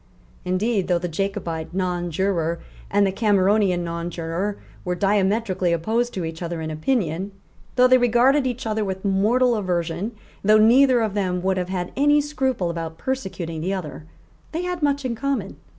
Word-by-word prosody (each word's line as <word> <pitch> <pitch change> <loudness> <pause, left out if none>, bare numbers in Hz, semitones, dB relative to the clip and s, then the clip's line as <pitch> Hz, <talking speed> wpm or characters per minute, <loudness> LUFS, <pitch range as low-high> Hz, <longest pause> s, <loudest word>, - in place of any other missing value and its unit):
Indeed, 195 +2 0
though 180 - +2
the 175 +1 -3
Jacobite 170 -2 -3
nonjuror 175 -2 -1 0.3
and 205 0 +3
the 195 - +1
Cameronian 195 -3 +2
nonjuror 170 +3 -3 0.3
were 180 -1 -1
diametrically 195 -1 +1
opposed 225 +9 0
to 180 -3 -2
each 160 +1 -6
other 170 -1 -3
in 160 0 -4
opinion, 180 - -1 0.4
though 250 0 +6
they 255 0 +5
regarded 250 +3 +3
each 250 0 -4
other 215 -1 0
with 190 0 -4
mortal 225 +6 +3
aversion, 180 +1 -2 0.3
though 215 +2 +6
neither 245 +3 +5
of 215 -3 -1
them 180 -3 -1
would 190 0 +1
have 180 0 -2
had 180 -2 -3
any 290 +2 +4
scruple 265 -11 -1
about 165 -1 -5
persecuting 185 -11 -4
the 190 +4 -1
other, 155 -3 -7 0.5
they 335 +3 -2
had 360 -1 -3
much 285 -2 +1
in 250 - -1
common. 235 -5 -3
195 Hz, 165 wpm, -23 LUFS, 175-235 Hz, 0.5 s, though